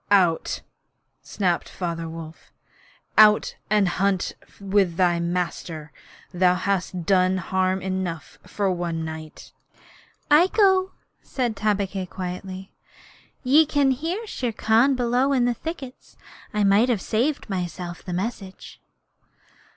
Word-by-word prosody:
'Out!' 180 -5 +2 0.6
snapped 180 -4 -1
Father 165 -2 -4
Wolf. 160 -1 -10 0.7
'Out 210 -1 +6
and 210 -2 +3
hunt 190 +1 0 0.3
with 195 -3 +1
thy 175 -2 +3
master. 170 -3 -3 0.4
Thou 180 0 +3
hast 185 -2 -2
done 185 0 +3
harm 185 0 0
enough 185 -3 -4
for 200 -2 -1
one 170 -2 -3
night.' 160 -1 -9 0.8
'I 315 +5 +7
go,' 380 -2 +4 0.3
said 245 -4 -2
Tabaqui, 200 -2 -1
quietly. 185 +1 -7 0.7
'Ye 280 +5 +6
can 285 -2 +2
hear 330 - -3
Shere 250 - -3
Khan 225 +5 +3
below 250 +3 +1
in 250 -3 +2
the 245 - +2
thickets. 270 -1 -8 0.3
I 210 -1 0
might 200 +5 +4
have 235 -5 +1
saved 245 +10 -1
myself 180 -2 -4
the 180 - -7
message.' 190 +1 -5
195 Hz, 120 wpm, -24 LUFS, 180-240 Hz, 0.8 s, I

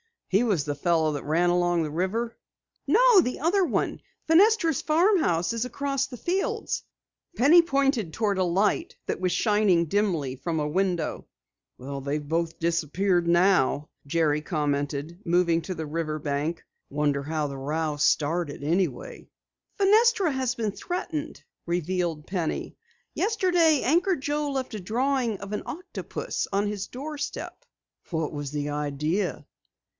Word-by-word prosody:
He 195 +3 +3
was 200 -11 +1
the 145 0 -2
fellow 160 +1 +1
who 145 - -3
ran 165 +4 +1
along 175 -1 +2
the 150 - -4
river?" 210 +8 -2 0.5
"No, - - +6
the 250 -8 0
other. 360 +3 +2 0.6
Fenestra's 335 - +4
farmhouse 310 - +2
is 230 0 -1
across 275 +2 -2
the 250 - -9
fields." 390 - -2 0.5
Penny 320 +6 +7
pointed 275 - 0
toward 205 -2 0
a - - +3
light 205 - +1 0.3
shining 205 -3 +2
dimly 165 -8 0
from 160 +4 -2
a 150 - -1
window. 180 0 -1 0.5
"They've 140 +3 -4
both 165 +1 -1
disappeared 170 +2 +1
now," 170 -5 +3 0.2
Jerry 150 -1 +1
commented, 145 0 -2
moving 170 -1 +2
to 185 - -4
the 160 - -4
river 155 0 -3
bank. 150 +3 -2 0.3
"Wonder 145 -1 0
how 155 +1 -2
the 140 -1 -6
row 150 +2 -2
started 150 0 +1
anyway?" 190 - -2 0.5
"Fenestra 415 -2 +4
has 260 -2 -1
been 220 -4 -1
threatened," 325 - -5 0.2
revealed 175 -2 -1
Penny. 175 -4 -3 0.4
"Yesterday 355 - +2
Anchor 350 +7 +3
Joe 295 0 -2
left 265 -3 -3
a 215 - -4
drawing 240 +3 0
of 200 0 -7
an 210 - -2
octopus 355 +5 -5
on 200 +1 +1
his 205 -1 -4
doorstep." 295 - -6 0.5
"What 160 -2 -1
was 145 -2 -5
the 145 0 -3
idea?" 150 +4 -2
180 Hz, 135 wpm, -26 LUFS, -, 0.6 s, Penny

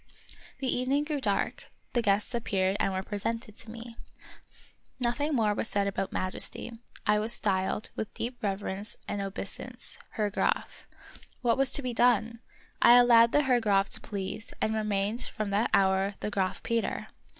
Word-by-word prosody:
The 270 - -4
evening 260 +3 +1
grew 295 -2 -3
dark; 205 -5 -1 0.3
the 240 - +2
guests 205 +1 +1
appeared 195 -5 0
and 195 - +1
were 190 0 -2
presented 215 +2 -4
to 230 - -8
me. 230 +1 -9 1.0
Nothing 280 +5 +1
more 215 -4 +2
was 210 - 0
said 200 -1 +1
about 195 -1 -2
Majesty; 185 +5 -2 0.3
I 210 0 +3
was 220 +2 0
styled, 190 +1 0
with 215 - -4
deep 245 +2 -4
reverence 200 0 -1
and 205 -1 -2
obeisance, 195 0 -4
Herr 210 -3 -1
Graf. - - -1 0.6
What 235 -1 +3
was 270 -1 +6
to 285 - +4
be 250 -1 -2
done? 230 -1 +2 0.4
I 240 - +8
allowed 235 -1 +7
the 295 - +3
Herr 250 -3 +3
Graf 195 -2 +2
to - - -1
please, 200 +2 -5
and 220 - 0
remained 210 +1 -1
from 215 -2 -4
that 205 +3 +1
hour 195 0 +2
the 210 - -3
Graf 190 -2 -1
Peter. 230 -1 -1
215 Hz, 165 wpm, -29 LUFS, 200-240 Hz, 1.0 s, I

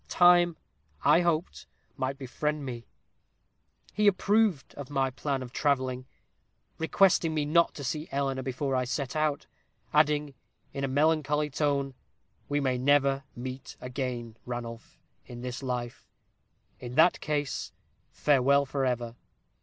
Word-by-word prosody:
Time, 175 -1 +5 0.5
I 175 - +5
hoped, 160 - -1 0.3
might 130 +1 -2
befriend 145 +2 -3
me. 120 -3 -6 1.1
He 210 0 +2
approved 205 -4 +2
of 145 -1 -8
my 135 -2 0
plan 135 0 -2
of 125 0 -10
travelling, 130 -3 0 0.7
requesting 165 0 +3
me 150 -1 0
not 170 +3 +3
to 145 - -7
see 150 +4 -3
Eleanor 135 -1 -1
before 130 +1 -2
I 130 - +1
set 135 +3 -3
out; 155 -2 0 0.5
adding, 150 -1 +3 0.4
in 140 - -4
a - - +1
melancholy 150 +1 +1
tone 140 -1 0 0.6
'We 145 0 +1
may 130 -2 +1
never 140 0 +3
meet 130 +2 -7
again, 125 -3 -4
Ranulph, 120 -1 -7 0.3
in 120 -1 -9
this 125 +1 -5
life; 125 -2 -4 0.7
in 125 0 -7
that 165 +4 +5
case, 145 -2 -2 0.4
farewell 140 0 +3
forever. 125 -4 -1
140 Hz, 130 wpm, -28 LUFS, 130-150 Hz, 1.1 s, Time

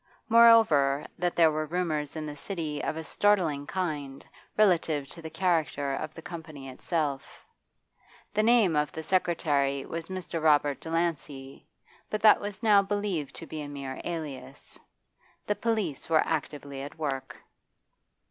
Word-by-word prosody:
Moreover, 220 -12 +6
that 175 0 0
there 165 -2 +5
were 155 0 -2
rumours 155 -4 -2
in 155 -1 -4
the 150 -1 -6
City 155 -2 -4
of - - -2
a 160 - -4
startling 165 -7 +1
kind, 150 -7 -4 0.3
relative 165 -8 +2
to 170 - -9
the 160 - -7
character 155 -5 0
of 155 +3 -5
the 165 - -10
Company 155 -5 -8
itself. 145 +1 -3 0.9
The 210 - +2
name 220 -7 +4
of 150 -2 +1
the 160 - -6
secretary 150 -6 +1
was 165 +1 -5
Mr. 185 -3 -4
Robert 145 -2 +3
Delancey, 150 -5 -3 0.4
but 215 0 -3
that 215 - +7
was 205 +2 -6
now 210 -3 +6
believed 200 -7 -2
to - - -8
be 155 -1 -6
a 145 - -6
mere 140 -2 -6
alias. 140 -5 -7 0.7
The 210 - +1
police 210 - -2
were 160 -1 +4
actively 145 -3 -4
at 145 +3 -8
work. 140 -4 -4
160 Hz, 145 wpm, -28 LUFS, 145-180 Hz, 0.9 s, that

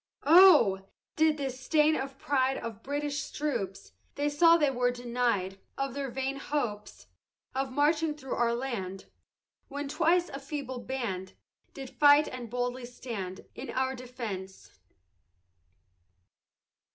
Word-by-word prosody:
Oh! 290 - +7 0.3
this 315 -1 +4
did 275 -2 -2
stain 300 +5 +2
the 270 -3 -1
pride 270 -1 0
Of 225 -2 -7
British 290 +2 -3
troops, 200 -11 -3 0.2
They 290 +1 0
saw 330 +3 +6
they 295 -4 +2
were 245 -1 +1
deny'd 240 -6 -1 0.2
Of 275 -2 -2
their 275 0 -3
vain 265 +2 -3
hopes 240 -8 -4 0.5
Of 265 0 -2
marching 300 +3 +2
thro' 270 -3 -5
our 235 0 +1
land, 200 -7 -4 0.6
When 285 +1 -5
twice 335 +4 +2
a 275 - -6
feeble 275 -3 -5
band, 225 -8 -4 0.4
Did 270 -2 -8
fight 290 0 +6
and 245 -2 -7
boldly 245 +1 -3
stand 210 -7 -7
In - - -8
our 260 0 0
defence. 230 -7 -8
265 Hz, 125 wpm, -29 LUFS, 235-290 Hz, 0.6 s, Oh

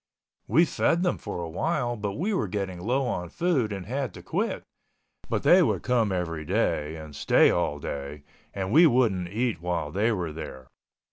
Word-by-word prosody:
We 165 +3 +5
fed 170 +1 +1
them 180 - 0
for 85 - -5
awhile 120 - -1
but 105 -3 -3
we 195 - -1
were 185 - 0
getting 95 -2 -3
low 130 +7 0
on 90 -8 -3
food 140 - 0
and 95 -3 -5
had 130 -2 -3
to - - -10
quit, - - -2 0.7
but - - -1
they - - +7
would - - +1
come 115 -5 +2
every 85 -4 -2
day 75 0 0
and 80 -2 -9
stay - - +4
all 75 - 0
day 70 0 -6 0.3
and 95 -1 -4
we 165 +6 +7
wouldn't 115 - +2
eat 110 0 -1
while 85 -4 -2
they 105 +7 +1
were 90 -7 -2
there. 65 -5 -8
100 Hz, 185 wpm, -26 LUFS, 85-125 Hz, 0.7 s, they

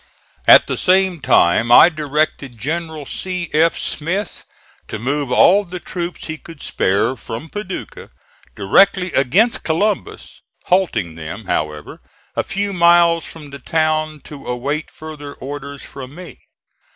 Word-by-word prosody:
At - - +8
the - - -3
same 185 -2 +2
time 90 +5 +3
I 120 - +9
directed 150 -4 -2
General 160 +4 -4
C. 180 +2 -4
F. 165 +2 +3
Smith 180 +7 -3 0.4
to - - -5
move 135 +4 -2
all 195 +10 +5
the 180 -1 -7
troops 175 0 -6
he 160 -1 -6
could 165 -3 -13
spare 100 +4 0
from 120 +5 -8
Paducah 205 -1 -7 0.5
directly 180 - +3
against 195 - +3
Columbus, 210 - -2 0.2
halting 145 - +1
them, 80 +7 -8
however, 75 -4 -3 0.3
a - - 0
few 200 0 -3
miles 170 -1 +4
from 150 -3 -10
the 140 - -9
town 155 +1 -1
to 145 -2 -11
await 140 +6 -3
further 150 -2 -10
orders 140 +1 -8
from 135 0 -10
me. 180 0 -11
155 Hz, 135 wpm, -18 LUFS, 135-175 Hz, 0.5 s, I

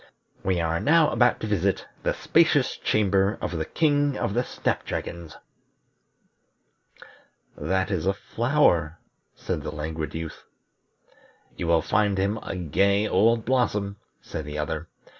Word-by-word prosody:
"We 95 -2 +1
are 85 0 0
now 155 0 +4
about 120 -1 +3
to - - -2
visit 100 -2 0 0.2
the - - 0
spacious - - +3
chamber 100 0 +1
of - - -3
the 80 -1 -2
King 145 -3 +1
of 100 - -1
the 120 +3 +1
Snap - - -2
dragons." 85 -2 -6 2.2
"That 95 +5 -1
is 90 -3 -1
a 95 - +3
flower," 110 - +1 0.4
said - - -3
the - - -5
Languid 80 +1 -5
Youth. 80 -1 -6 1.1
"You 85 - -4
will 85 -1 +3
find 105 -2 +1
him 100 +3 0
a - - -5
gay 100 +5 +2
old 115 +4 +3
blossom," 105 -6 0 0.2
said 80 - -6
the 75 0 -6
other. 75 0 -3
95 Hz, 140 wpm, -25 LUFS, 85-115 Hz, 2.2 s, now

